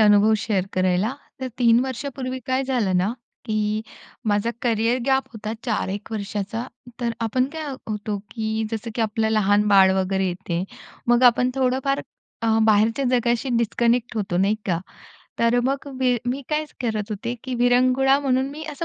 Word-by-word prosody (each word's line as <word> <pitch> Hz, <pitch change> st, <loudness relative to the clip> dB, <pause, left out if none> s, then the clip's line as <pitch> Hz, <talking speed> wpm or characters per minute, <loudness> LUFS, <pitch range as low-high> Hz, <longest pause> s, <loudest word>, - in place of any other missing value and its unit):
अनुभव 210 Hz, 0 st, +6 dB
शेअर 205 Hz, -3 st, 0 dB
करायला. 185 Hz, +6 st, +1 dB, 0.3 s
तर 260 Hz, -, -2 dB
3 235 Hz, -2 st, +5 dB
वर्षापूर्वी 260 Hz, 0 st, -4 dB
काय 260 Hz, +1 st, +1 dB
झालं 235 Hz, -8 st, +1 dB
ना 190 Hz, +5 st, +1 dB, 0.3 s
की 215 Hz, -1 st, 0 dB, 0.5 s
माझा 205 Hz, +2 st, +1 dB
करियर 230 Hz, +1 st, +2 dB
गॅप 270 Hz, 0 st, +2 dB
होता 215 Hz, -1 st, -5 dB
4 225 Hz, -5 st, -1 dB
एक 205 Hz, +3 st, -5 dB
वर्षाचा. 210 Hz, +2 st, -3 dB, 0.3 s
तर 235 Hz, -1 st, 0 dB
आपण 230 Hz, +3 st, +1 dB
काय 320 Hz, -1 st, -5 dB, 0.2 s
होतो 210 Hz, -1 st, -3 dB
की 220 Hz, -1 st, -2 dB
जसं 225 Hz, +1 st, -3 dB
की -, -, -2 dB
आपलं 220 Hz, 0 st, 0 dB
लहान 210 Hz, -1 st, +3 dB
बाळ 195 Hz, -2 st, +7 dB
वगैरे 190 Hz, 0 st, +1 dB
येते. 175 Hz, -1 st, -3 dB, 0.5 s
मग 240 Hz, +1 st, +4 dB
आपण 250 Hz, +1 st, +5 dB
थोडंफार 265 Hz, +1 st, +1 dB, 0.4 s
अ, -, -, 0 dB, 0.2 s
बाहेरच्या 220 Hz, +5 st, +3 dB
जगाशी 240 Hz, +1 st, +1 dB
डिस्कनेक्ट 235 Hz, +1 st, +1 dB
होतो 195 Hz, -4 st, -1 dB
नाही 200 Hz, +3 st, +3 dB
का? 175 Hz, -4 st, +1 dB, 0.6 s
तर 235 Hz, +1 st, +3 dB
मग 275 Hz, +2 st, -1 dB
मी 250 Hz, -2 st, +3 dB
मी 265 Hz, +3 st, -2 dB
काय 305 Hz, 0 st, 0 dB, 0.2 s
करत 220 Hz, -4 st, -2 dB
होते 225 Hz, +3 st, -3 dB
की 260 Hz, -1 st, -3 dB
विरंगुळा 255 Hz, +3 st, +4 dB
म्हणून 265 Hz, -1 st, +1 dB
मी 300 Hz, +2 st, -8 dB
असं 335 Hz, -, -4 dB
230 Hz, 160 wpm, -23 LUFS, 210-255 Hz, 0.6 s, बाळ